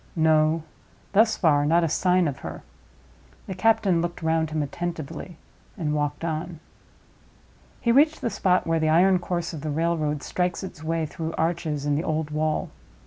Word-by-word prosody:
No; 160 0 +3 0.5
thus 220 +2 +4
far, 145 -4 +3
not 165 +4 +3
a - - +2
sign 180 +2 +2
of 140 -3 -4
her. - - -8 0.8
The 190 - -5
captain 190 -3 +2
looked 170 0 -4
round 160 -1 +1
him 155 -1 -1
attentively, 165 +2 -6 0.4
and 155 -5 -1
walked 150 +1 -2
on. 160 +1 -4 1.2
He 235 - +2
reached 300 +5 +4
the 230 - -1
spot 185 -2 +1
where 165 0 +1
the 155 0 +1
iron 180 +3 +4
course 175 -1 -3
of 155 - -6
the 155 - -4
railroad 155 -1 -1
strikes 180 +1 -2
its 175 -4 -8
way 165 0 -1
through 160 +1 -5
arches 160 -3 -1
in 145 - +1
the 150 +3 0
old 155 -2 -2
wall. 155 0 -1
165 Hz, 170 wpm, -25 LUFS, 155-175 Hz, 1.2 s, thus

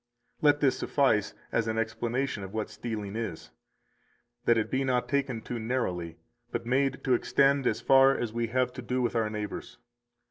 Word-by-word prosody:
250 - - -4
Let - - -18
this 135 -3 +2
suffice 110 -8 +2 0.2
as 115 - +1
an 110 0 -1
explanation 120 +2 -1
of 95 +2 -8
what 110 -1 -2
stealing 105 -4 -5
is, 110 -8 -5 0.9
that 120 - +4
it 110 - -1
be 135 +1 +1
not 125 -2 0
taken 130 -4 -1
too 120 - -4
narrowly, 90 -9 -2 0.3
but 120 0 -3
made 135 +3 +1
to 130 - +2
extend 135 +2 +3
as - - 0
far 135 0 +6
as 115 -2 -3
we 120 0 -1
have 125 +2 0
to 130 - -7
do 125 +1 -1
with 120 - -1
our 110 -2 +1
neighbors. 105 -1 -6
120 Hz, 185 wpm, -29 LUFS, 110-130 Hz, 0.9 s, far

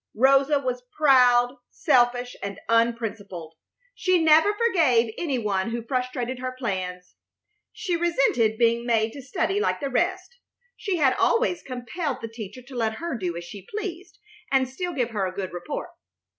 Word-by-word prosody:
Rosa 275 +4 +4
was 255 -2 -2 0.2
proud, 250 -3 +5
selfish, 245 0 +2
and 200 -1 -5
unprincipled. 225 -7 -1 0.4
She 370 -6 +2
never 320 +4 +5
forgave 305 - +3
any 290 -7 -1
one 205 -3 -1
who 235 0 -3
frustrated 250 0 -2
her 255 0 -4
plans. 185 -6 -4 0.6
She 395 -5 -2
resented 270 -10 +2
being 235 0 +2
made 225 -2 +1
to 280 - -8
study 325 +9 -1
like 435 - 0
the 280 -2 -3
rest. 370 - -1 0.4
She 390 -3 -2
had 270 -5 +4
always 460 -8 +2
compelled 255 +4 -4
the 230 - -5
teacher 225 +2 -9
to 260 +1 -12
let 225 -2 0
her 335 -1 -4
do 180 -6 -3
as 170 - -6
she 195 +2 -10
pleased 380 -3 -6 0.3
and 265 -1 +3
still 350 +8 -4
give 245 -5 -1
her 200 -4 -1
a - - -4
good 190 -3 -4
report. 175 - -5
250 Hz, 160 wpm, -25 LUFS, 225-305 Hz, 0.6 s, proud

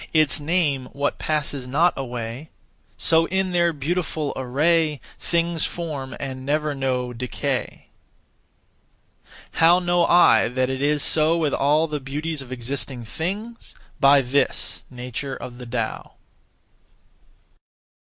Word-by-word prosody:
Its 155 -2 +4
name 145 -5 0
what 140 0 -1
passes 145 -4 -2
not 160 +7 +3
away; 125 +2 -5 0.5
So, 165 0 +3
in 190 0 0
their 170 -1 +3
beautiful 155 0 -2
array, 150 +4 +1 0.2
Things 170 -1 0
form 150 -6 -4
and 130 -1 -5
never 150 +2 0
know 130 -2 -1
decay. 125 0 -3 1.7
How 165 +2 +5
know 175 -1 +2
I 170 -10 +6
that 130 +1 0
it 130 0 -3
is 145 0 +2
so 160 +2 +3
with 155 -4 0
all 150 +3 +3
the 150 -2 -3
beauties 145 +3 -4
of 130 -2 -11
existing 125 0 -4
things? 205 - -5 0.2
By 140 0 +6
this 135 +2 0
(nature 125 +2 -5
of 125 0 -9
the 125 - -8
Tao). 115 - -4
145 Hz, 120 wpm, -23 LUFS, 130-165 Hz, 1.7 s, I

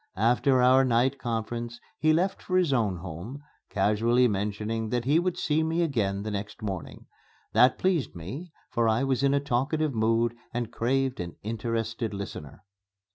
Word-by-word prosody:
After 125 +2 +3
our 130 +1 +6
night 130 +2 +2
conference 120 0 -3 0.2
he 155 - +4
left 180 +5 +1
for 185 - 0
his 175 -6 +2
own 110 -7 +1
home, 95 - -8 0.3
casually 110 +5 +3
mentioning 105 +2 -2
that 120 0 -1
he 145 +5 +4
would 180 0 -1
see 150 +1 +1
me 165 +2 +1
again 100 -10 0
the 110 - -4
next 105 +2 -5
morning. 95 -5 -5 0.5
That 125 +1 +5
pleased 180 - 0
me, 130 - -7 0.2
for 115 -1 +2
I 110 +4 +2
was 135 -1 +1
in 140 0 +3
a - - +3
talkative 140 +3 0
mood 115 +1 +1 0.2
and 120 -1 -2
craved 130 +2 0
an 85 -1 -5
interested 115 0 -2
listener. 95 -4 -7
120 Hz, 165 wpm, -27 LUFS, 110-135 Hz, 0.5 s, our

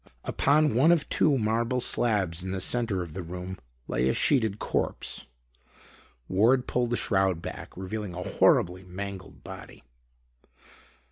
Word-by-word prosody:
Upon 150 +1 +2
one 135 +9 +5
of 165 -4 +2
two 145 -3 +3
marble 115 +2 0
slabs 95 -9 +1
in 95 - -5
the 95 0 -2
center 105 -2 0
of 85 -3 -10
the 95 - -5
room, 90 +2 -7 0.3
lay 65 +2 +1
a - - +2
sheeted 110 -7 +2
corpse. - - -2 1.0
Ward 120 +7 +3
pulled 125 -1 0
the 120 - 0
shroud 95 -4 +1
back, - - -8
revealing 95 0 -5
a 90 - -4
horribly 90 +1 +2
mangled 95 0 -8
body. - - -11
100 Hz, 140 wpm, -27 LUFS, 90-120 Hz, 1.0 s, one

